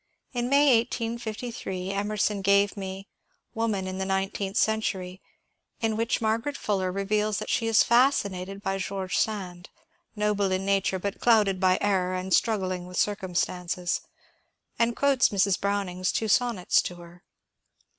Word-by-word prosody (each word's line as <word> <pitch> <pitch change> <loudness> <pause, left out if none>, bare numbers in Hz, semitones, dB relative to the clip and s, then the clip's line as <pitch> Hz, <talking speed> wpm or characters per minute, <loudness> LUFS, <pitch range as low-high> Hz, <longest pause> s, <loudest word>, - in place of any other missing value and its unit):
In 245 0 -1
May, 280 -3 +5
1858, 230 -5 -4
Emerson 205 0 -1
gave 200 +1 +3
me 195 0 -6 0.2
" - - -45
Woman 220 -4 -1
in 185 0 -5
the 190 - -1
Nineteenth 195 +1 -2
Century," 195 -4 -1 0.6
in 225 -1 0
which 230 +1 0
Margaret 230 +5 -1
Fuller 190 -3 -1
reveals 210 +2 0
that - - -4
she 230 - +1
is 225 -1 +5
fascinated 200 -6 +1
by 195 -1 -1
Greorge 190 -1 -4
Sand 185 -5 -2
(^^ - - -32 0.3
noble 210 -2 0
in 185 +1 -1
nature, 195 -1 +1
but 200 +2 -4
clouded 210 -5 +4
by 185 -1 +3
error, 185 -2 +1
and 185 0 -2
struggling 185 -5 +1
with 180 - -8
circum 190 -3 -1
stances") 180 0 -1 0.8
and 235 0 +2
quotes 280 -2 +3
Mrs. 200 -2 +1
Browning's 195 -2 -1
two 220 - -1
sonnets 225 -4 +2
to 180 - -6
her. 175 +1 -14
200 Hz, 150 wpm, -26 LUFS, 185-220 Hz, 0.8 s, May